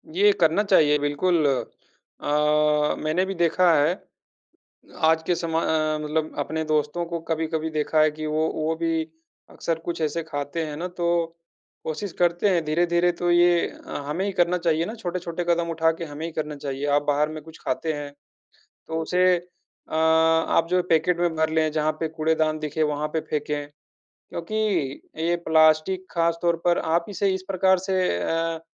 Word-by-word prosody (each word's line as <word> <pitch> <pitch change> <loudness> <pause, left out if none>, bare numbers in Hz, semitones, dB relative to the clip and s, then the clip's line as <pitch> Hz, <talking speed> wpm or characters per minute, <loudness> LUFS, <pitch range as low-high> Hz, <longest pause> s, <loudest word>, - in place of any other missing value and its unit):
ये 410 +3 +5
करना 165 +6 +4
चाहिए 155 -7 +4
बिल्कुल। 155 +3 +1
अ, 135 -3 -5 0.8
मैंने 160 +5 +1
भी 195 - -3
देखा 170 +1 +3
है, 155 +4 +3 1.0
आज 160 -1 +3
के 175 - +2
समय 165 -1 -1 0.4
मतलब 155 +1 -2
अपने 160 +1 -2
दोस्तों 155 +2 0
को 170 0 -4
कभी-कभी 160 0 -1
देखा 155 0 +1
है 155 - +4
कि 155 +1 -6
वो 155 +1 0
वो 155 +1 -1
भी 165 0 0 0.5
अक्सर 165 -1 -3
कुछ 170 -1 -4
ऐसे 155 +2 -1
खाते 145 +1 -4
हैं 150 -1 -6
ना 175 +4 -4
तो 175 -1 -3 0.8
कोशिश 170 +4 -4
करते 175 +3 +2
हैं 175 -4 +2
धीरे-धीरे 170 +3 +2
तो 175 0 +1
ये 175 0 +4 0.2
हमें 150 +6 -3
ही 200 - -2
करना 180 -1 +2
चाहिए 165 -1 +1
ना 220 - -5
छोटे-छोटे 175 -4 -4
कदम 170 0 +1
उठा 160 0 +2
के 165 +1 -6
हमें 150 0 -7
ही 165 - -7
करना 150 -1 -4
चाहिए। 140 0 -4
आप 145 - +2
बाहर 145 +1 +2
में 155 0 -7
कुछ 160 +1 -14
खाते 160 +5 -1
हैं, 145 -1 -6 0.8
तो 160 0 -2
उसे 180 +2 +3 0.5
अ, - - -4
आप 160 +1 +3
जो 180 0 +3
पैकेट 165 +2 +2
में 175 -1 +1
भर 160 0 +1
लें 160 -1 +1
जहाँ 155 0 +1
पे 160 - 0
कूड़ेदान 155 0 0
दिखे 155 +1 -1
वहाँ 150 0 -1
पे 160 - +1
फेंके, 150 -1 -3 0.5
क्योंकि 170 +6 -8 0.6
ये 170 +2 +1
प्लास्टिक 160 +4 +3
ख़ास 170 -1 +1
तौर 170 -1 +2
पर 175 0 +4
आप 165 +1 0
इसे 200 0 0
इस 190 0 -4
प्रकार 190 0 +3
से 190 0 -1 0.2
अ, 165 - -1
160 Hz, 175 wpm, -24 LUFS, 155-175 Hz, 1.0 s, ये